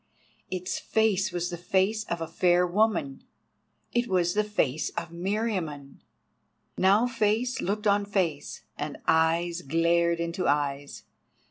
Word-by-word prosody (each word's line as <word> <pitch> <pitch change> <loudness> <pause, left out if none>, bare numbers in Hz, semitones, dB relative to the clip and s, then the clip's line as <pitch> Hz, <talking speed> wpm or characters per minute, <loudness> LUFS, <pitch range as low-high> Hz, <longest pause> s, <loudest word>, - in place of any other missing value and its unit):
its 185 0 -3
face 210 -3 +1
was 175 0 -2
the 175 - -4
face 195 +5 0
of 170 -4 -4
a 165 - -3
fair 180 +1 +3
woman—it 210 - -3
was 175 -3 +1
the 210 - +2
face 160 -9 -1
of - - -4
Meriamun! 175 -6 -3 0.8
Now 200 +5 +4
face 235 +1 0
looked 210 +3 -2
on 205 0 +3
face, 175 -8 -2 0.2
and 150 0 -4
eyes 165 +2 +2
glared 170 +3 +2
into 170 +2 -2
eyes. 145 -1 -1
180 Hz, 125 wpm, -27 LUFS, 165-205 Hz, 0.8 s, Now